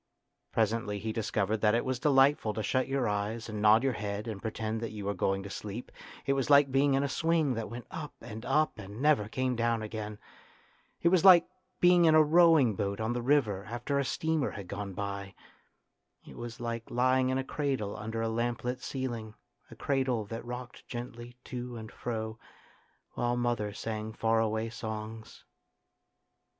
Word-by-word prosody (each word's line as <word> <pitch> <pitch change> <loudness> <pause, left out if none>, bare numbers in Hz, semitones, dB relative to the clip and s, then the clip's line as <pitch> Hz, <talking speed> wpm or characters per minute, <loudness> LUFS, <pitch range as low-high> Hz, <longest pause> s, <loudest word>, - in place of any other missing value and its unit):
Presently 110 -1 0
he 110 +2 -3
dis 110 -1 -2
covered 105 +3 +1
that 105 0 +4
it 120 - 0
was 130 -1 -1
delightful 135 -6 +3
to 110 - -2
shut 130 +3 +1
your 135 -3 0
eyes 105 +3 -2
and 105 -2 -4
nod 110 +3 +6
your 135 -2 +2
head 105 0 -4
and 105 -3 -5
pretend 110 0 -3
that 115 - -3
you 105 -2 -7
were 100 - 0
going 95 +1 0
to 100 - -7
sleep; 105 +5 -6 0.3
it 140 - +2
was 135 -1 -1
like 140 -1 +6
being 135 +1 +3
in 135 - +2
a - - +1
swing 160 0 +1
that 115 -2 -4
went 120 +1 -7
up 155 -3 -6
and 110 -1 -8
up 150 -1 +1
and 100 +2 -8
never 145 -7 +3
came 130 +1 -1
down 115 -1 0
again. 105 -1 -5 0.9
It 170 - +6
was 180 -2 +3
like 185 -3 +9 0.3
being 175 -1 +6
in 160 -1 +6
a 155 - +8
rowing 160 -6 +5
boat 100 -1 -2
on 110 +2 -1
the 120 - -2
river 120 -7 +2
after 120 +6 -2
a - - +2
steamer 160 +2 0
had 100 -3 -8
gone 100 +1 -5
by. 100 -1 -5 0.9
It - - -12
was 120 -1 -7
like 115 -1 -4
lying 130 +1 +2
in 130 - +1
a 135 - -1
cradle 135 -8 -2
under 110 +1 -4
a - - 0
lamplit 120 +2 -2
ceiling, 120 -6 -4 0.3
a - - -11
cradle 130 -5 0
that 115 +3 -6
rocked 120 0 -8
gently 120 0 -7
to 125 -1 -6
and 110 +1 -8
fro 110 -1 -4 0.7
while 120 0 -1
mother 120 -4 0
sang 110 +1 -5
far 115 0 +2
away 110 0 0
songs. 110 -1 -7
115 Hz, 185 wpm, -30 LUFS, 110-130 Hz, 0.9 s, like